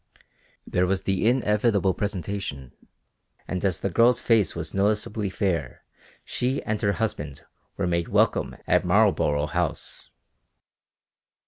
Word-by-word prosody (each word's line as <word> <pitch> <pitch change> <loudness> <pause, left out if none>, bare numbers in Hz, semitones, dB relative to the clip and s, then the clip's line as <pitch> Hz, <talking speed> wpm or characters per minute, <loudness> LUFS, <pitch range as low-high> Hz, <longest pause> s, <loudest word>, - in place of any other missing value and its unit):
There 90 +1 +1
was 95 0 0
the 95 +2 0
inevitable 105 -5 +2
presentation 90 - -4 0.8
and 90 - -3
as 95 -4 0
the 100 - -1
girl's 120 +6 +4
face 110 -7 +2
was - - -4
noticeably 105 +1 0
fair 95 -2 -2 0.4
she 130 +2 -1
and 105 -1 -2
her 100 -3 +2
husband 75 -11 -4 0.3
were 100 - 0
made 85 -1 0
welcome - - +1
at - - +3
Marlborough 75 0 +3
House. - - -3
100 Hz, 120 wpm, -25 LUFS, 90-105 Hz, 0.8 s, girl's